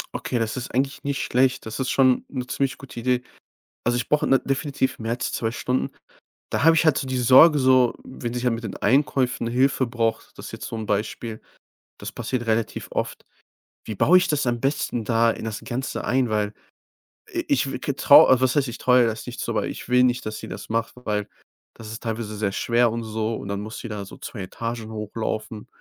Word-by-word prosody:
Okay, 120 - -2
das 115 +1 -2
ist 125 - -6
eigentlich 135 +2 -1
nicht 140 -1 -2
schlecht. 130 +1 +1
Das 110 +3 -6
ist 130 - -1
schon 130 -2 +3
'ne 125 -3 -4
ziemlich 135 +1 -1
gute 135 -3 -9
Idee. 125 +1 +1 0.6
Also, 120 0 +2
ich 120 - -2
brauche, 150 - +2
ne, 135 - +5
definitiv 135 0 -1
mehr 115 0 -4
als 120 - -2
2 115 - -1
Stunden. 125 +2 -1 0.6
Da - - 0
habe 165 0 +7
ich 165 0 +3
halt 155 - +4
so 135 - -2
diese 130 -1 -1
Sorge 150 +6 +8
so, 130 -2 +4
wenn 120 -2 -6
sie 125 0 -3
halt 125 -2 +2
mit 115 +1 -6
den 105 - -5
Einkäufen 130 -3 +1
Hilfe 130 +2 +2
braucht 115 -1 -2
das - - -8
ist - - -9
jetzt - - -7
so - - -5
'n 110 -1 -5
Beispiel, 110 +2 -3 0.6
das - - -6
passiert 120 -3 -3
relativ 110 0 -1
oft. - - -3 0.6
Wie 110 - -5
baue 180 - +5
ich 180 -2 +2
das 145 -2 0
am 120 -1 0
besten 135 -3 -1
da 115 0 +3
in 110 - -6
das 110 -2 -4
Ganze 130 +3 -4
ein? 125 -1 +1
Weil 105 -1 0 0.8
i - - -1
ich - - +2
w - - -3
g - - -2
traue 130 - +7
was 130 +1 +2
heißt 140 -2 +2
ich 120 - -6
traue 125 0 +4
ihr 120 - +4
das 110 -1 -4
nicht - - -7
zu, - - -2
aber - - -1
ich - - -7
will 125 0 +5
nicht, 125 0 +1
dass 110 0 -4
sie - - -8
das - - -8
macht. 115 0 -1
Weil 105 -2 -1 0.5
das 110 -2 -10
ist 110 - -7
teilweise 110 -2 -4
sehr 105 -2 0
schwer 120 +2 +2
und 115 +1 -3
so 110 0 -2
und 100 - -7
dann 100 0 -2
muss 110 +1 -7
die 120 - -7
da 105 -2 -5
so - - -12
2 105 - -7
Etagen 115 +3 -5
hochlaufen. 110 0 -4
120 Hz, 230 wpm, -24 LUFS, 110-130 Hz, 0.8 s, Sorge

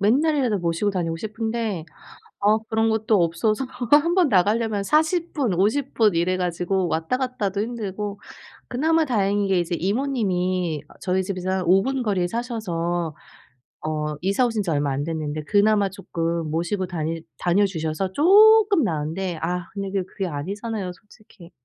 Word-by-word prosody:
맨날이라도 255 +1 +2
모시고 170 +4 0
다니고 170 -4 -2
싶은데 220 -2 -3 0.6
아 210 +1 +5
그런 225 0 +2
곳도 220 0 +1
없어서 215 +9 0 0.3
1 300 +4 +6
번 360 -3 +4
나가려면 210 0 +2
40 315 - +1
분, 265 - 0
50 220 +10 +1
분 215 -4 +3
이래 175 +2 +1
가지고 180 +1 -1
왔다 160 +8 0
갔다도 230 -7 -2
힘들고 210 -3 -4 0.5
그나마 320 +5 +2
다행인 205 -5 +1
게 190 - +2
이제 175 0 -2
이모님이 185 - -1
어 - - -16
저희 190 0 0
집에서 185 -1 -4
한 190 0 0
5 185 +3 +5
분 265 +3 -1
거리에 195 -5 0
사셔서 175 - -3 0.7
어 150 -1 -2
이사 200 +7 +2
오신 220 -3 -1
지 175 - -2
얼마 145 -2 0
안 135 +1 -1
됐는데 155 -1 -3
그나마 205 +3 +3
쪼끔 170 -4 -3
모시고 175 +4 -1
다니 165 -1 -3 0.2
다녀 180 +4 +2
주셔서 165 +1 -3
쪼끔 410 - +6
나은데 165 0 -2
아 180 +1 -2
근데 195 -1 -4
그 195 -1 0
그게 195 - -4
아니잖아요, 195 +6 -4
솔직히. 205 -2 -18
195 Hz, 320 characters per minute, -23 LUFS, 175-225 Hz, 0.7 s, 1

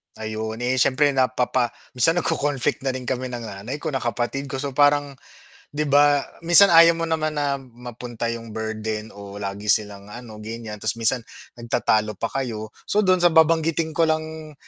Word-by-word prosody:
Ayun, 110 +1 -5
eh, 130 +1 0
siyempre 140 +3 +3
napapa 130 -2 0 0.2
minsan 125 +6 +3
nag-ko-conflict 145 -6 -1
na 130 - 0
rin 130 - -5
kami 130 0 -3
ng 120 - -5
nanay 110 +9 -7
ko, - - -2
ng 135 - -1
kapatid 120 +3 -3
ko, 135 0 -5
so 140 - -3
parang, 145 +1 +3 0.6
'di 150 - 0
ba, 145 0 +5 0.2
minsan 185 +3 +8
ayaw 165 0 +7
mo 165 - -4
naman 160 -2 -1
na 145 -2 -1
mapunta 120 -2 -7
'yung 115 -2 -7
burden 110 0 -4
o 100 0 -10
lagi 100 +1 -5
silang 100 -1 0
ano, 110 0 -10
ganiyan, 110 0 -7
ta's 110 +1 -1
minsan 115 +1 0 0.3
nagtatalo 110 -2 0
pa 115 +4 -4
kayo. 115 -5 -4 0.2
So, 210 - +2
dun 185 -2 +3
sa 175 -2 +3
babanggitin 160 0 +3
ko 165 +1 +1
lang 155 -1 -3
130 Hz, 175 wpm, -23 LUFS, 110-150 Hz, 0.6 s, minsan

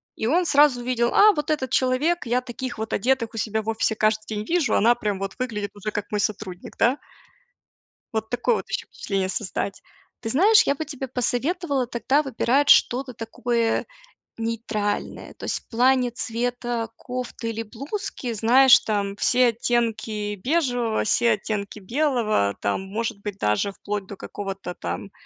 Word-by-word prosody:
и 220 - -2
он 345 +8 +3
сразу 285 -5 +4
увидел: 240 -1 0
"А, 425 +1 +7
вот 300 -2 -3
этот 265 -5 -1
человек, 270 +7 +1
я 245 +1 +1
таких 250 +1 -6
вот 220 0 -4
одетых 240 +1 +1
у - - -7
себя 220 0 -1
в 215 - -5
офисе 220 0 0
каждый 215 0 +1
день 210 -1 -4
вижу, 335 -1 +1
она 230 +3 +5
прям 210 -4 -2
вот 195 -1 -4
выглядит 210 -5 -3
уже, 205 +1 -4
как 205 0 -4
мой 210 - 0
сотрудник", 200 -3 -4
да. 250 +4 +3 1.2
Вот 220 0 -2
такое 245 - +1
вот - - -6
ещё - - -3
впечатление 195 -2 -2
создать. 195 0 -3 0.4
Ты 225 - -4
знаешь, 410 - +6
я 280 - +2
бы 315 - -4
тебе 275 -3 -6
посоветовала 265 +3 -1
тогда 250 +5 +1
выбирать 270 +1 +1
что-то 255 +1 +4
такое 230 +1 -1 0.5
нейтральное. 225 -2 -3
То - - -9
есть - - -1
в - - -32
плане 250 +1 +3
цвета 240 0 -2
кофты 250 -1 -5
или 225 0 -3
блузки, 255 - -5
знаешь, 245 +4 +6
там 200 -2 -2
все 250 +3 +4
оттенки 220 -3 -1
бежевого, 245 - 0
все 235 +2 +3
оттенки 205 0 -4
белого, 225 - +1
там, 100 - 0
может 215 +2 -4
быть, 205 -1 -5
даже 105 - +1
вплоть 205 0 -4
до 200 - -8
какого-то 195 -2 -6
там 195 - -5
230 Hz, 165 wpm, -24 LUFS, 210-255 Hz, 1.2 s, А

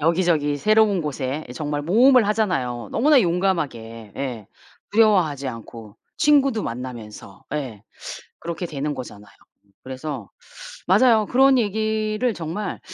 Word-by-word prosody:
여기저기 160 -3 +1
새로운 215 +3 +3
곳에 145 0 -3
예 - - -8
정말 145 +2 -3
모험을 235 - +5
하잖아요 135 - -1
너무나 285 +3 +4
용감하게. 150 - -2
예. 125 -7 -5 0.5
두려워하지 180 -11 +3
않고 115 -2 -10 0.2
친구도 275 -7 +3
만나면서 115 -5 -8
예. 125 -9 -5 0.6
그렇게 170 +1 -4
되는 150 -2 -3
거잖아요. 105 -6 -10 0.5
그래서 130 +3 -6 0.6
맞아요. 230 -4 +4
그런 265 +2 +4
얘기를 215 +1 0
정말 175 +5 -5
160 Hz, 295 characters per minute, -22 LUFS, 130-215 Hz, 0.6 s, 모험을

